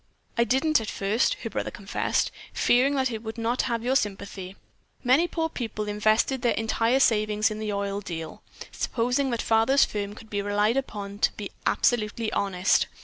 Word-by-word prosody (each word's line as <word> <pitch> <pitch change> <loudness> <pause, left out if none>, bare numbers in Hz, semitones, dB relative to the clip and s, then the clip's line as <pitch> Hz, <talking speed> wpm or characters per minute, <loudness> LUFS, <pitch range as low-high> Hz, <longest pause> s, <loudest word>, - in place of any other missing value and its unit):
"I 235 - +3
didn't 270 +5 +2
at 220 - -5
first," 205 +5 +1
her - - -3
brother - - -2
confessed, - - -1 0.2
"fearing 265 +4 +3
that 260 -2 +1
it 220 -1 -4
would 225 0 -7
not 230 +2 0
have 230 -1 -1
your 255 +2 +1
sympathy. 195 -4 -2 0.5
Many 270 +7 +4
poor 325 -2 -1
people 225 -8 -4
invested 215 +5 +2
their 240 - +2
entire 225 +3 +1
savings 215 -3 +2
in 215 - -5
the 215 -1 -2
oil 200 0 -2
deal, 165 -5 -6 0.3
supposing 250 +3 0
that 235 -2 -1
father's 225 +5 +4
firm 205 -1 -4
could 220 0 -14
be 205 -1 -1
relied 205 +3 +1
upon 205 -7 -4
to - - +3
be 205 -2 -7 0.2
absolutely 225 -1 +1
honest. 190 -2 +2
220 Hz, 175 wpm, -26 LUFS, 205-245 Hz, 0.5 s, Many